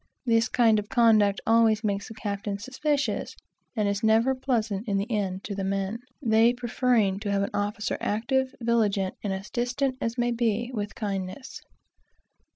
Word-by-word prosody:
This 230 -2 +3
kind 225 -3 +4
of 210 - -7
conduct 220 -5 +4
always 225 -1 +4
makes 200 -1 -1
the 220 - -10
captain 200 -1 -3
suspicious, 265 +2 -2 0.4
and 210 -3 +1
is 200 0 -1
never 225 +4 +3
pleasant, 230 -5 -1
in 200 -2 +1
the 195 - 0
end, 195 -3 -2
to 205 - -5
the 195 -1 -3
men; 195 +3 -2 0.2
they 225 0 +4
preferring 240 -5 +1
to 205 -1 -4
have 200 0 +1
an 200 - -3
officer 205 +1 -2
active, 260 +5 0
vigilant, 215 -5 +1
and 195 -1 -4
distant 255 +2 -1
as 230 0 -2
may 240 0 +1
be, 235 0 0
with 210 -2 -4
kindness. 195 +4 -5
220 Hz, 160 wpm, -26 LUFS, 200-240 Hz, 0.4 s, kind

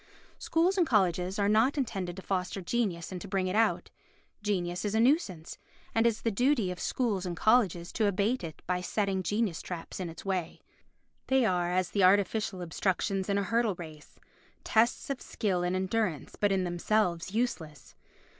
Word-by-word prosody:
Schools 360 +4 +1
and 340 - +3
colleges 185 -4 +1
are 200 -1 +2
not 225 +7 +3
intended 190 -9 -2
to 190 - -9
foster 185 0 -2
genius 190 -3 -2
and 180 -1 -6
to - - -7
bring 195 -1 0
it 185 +1 -2
out. 225 +1 +1 0.5
Genius 180 -4 -1
is 210 0 -1
a - - +3
nuisance, 225 - +1 0.3
and 225 +1 +3
it - - +6
is 225 - -6
the 230 - +1
duty 245 -3 +2
of 180 - -7
schools 220 -7 -1
and 175 -3 -4
colleges 195 -7 +2
to 220 -3 +1
abate 205 +5 0
it 160 -2 -8
by 180 0 -1
setting 195 0 -1
genius 205 -1 -1
traps 175 0 -7
in 180 -2 -3
its 165 +3 -10
way. 185 -4 -2 0.7
They 265 -2 +3
are 180 -3 +1
as 185 -1 0
the 200 - +2
artificial 195 0 +2
obstructions 190 +3 -1
in 200 - +2
a 200 - +1
hurdle 230 -1 +1
race—tests 175 - -3
of 270 - -4
skill 190 -5 -1
and 180 +1 0
endurance, 190 - -1
but 205 -1 +1
in 190 -1 +1
themselves 180 +1 0
useless. 165 -11 -3
195 Hz, 180 wpm, -30 LUFS, 180-220 Hz, 0.7 s, it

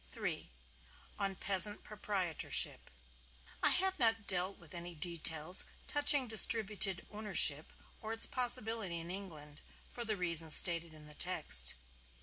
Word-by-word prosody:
III. - - -6 0.7
ON 195 -1 -2
PEASANT 200 +2 +4
PROPRIETORSHIP 200 -6 -3 0.7
I - - +2
have 380 -1 -2
not 225 -3 +1
dealt 185 +1 0
with 170 -4 -15
any 175 0 -9
details 160 +1 +1 0.2
touching 290 -2 +3
distributed 215 -4 +1
ownership, 195 -8 +2 0.3
or 220 - -7
its 225 0 +3
possibility 225 -7 -1
in 165 +1 -8
England, 155 -7 -10 0.3
for 240 - -7
the 215 -2 -4
reason 170 -3 +2
stated 170 0 +1
in 155 -1 -14
the 150 - -12
text. 180 - +2
190 Hz, 130 wpm, -33 LUFS, 170-220 Hz, 0.7 s, PEASANT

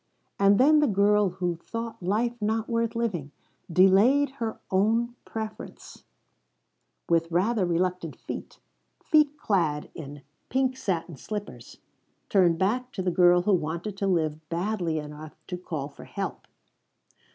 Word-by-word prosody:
And 200 0 +5
then 300 +4 +6
the 300 - +3
girl 205 0 +3
who 180 -1 -2
thought 230 +4 -6
life 215 +6 0
not 220 +1 0
worth 230 -1 -1
living, 200 -12 -2 0.4
delaying 200 - +5
her 225 -1 -2
own 225 +5 +2
preference, 220 -1 -8 1.0
with 165 0 +1
rather 190 +3 +2
reluctant 175 -1 -1
feet - - -8 0.5
feet 300 -1 +3
clad 170 - 0
in 145 -2 -9 0.3
pink 260 0 +1
satin 175 - -3
slippers 205 +8 -7 0.5
turned 175 -4 +4
back 245 +8 0
to 190 - -3
the 180 - +1
girl 175 0 +5
who 210 - +3
wanted 170 +4 -2
to 195 - -1
live 160 -5 +1
badly 175 -2 -1
enough 150 +1 -7
to 180 - -5
call 160 -6 -5
for 145 - -13
help. - - -5
190 Hz, 135 wpm, -27 LUFS, 170-225 Hz, 1.0 s, then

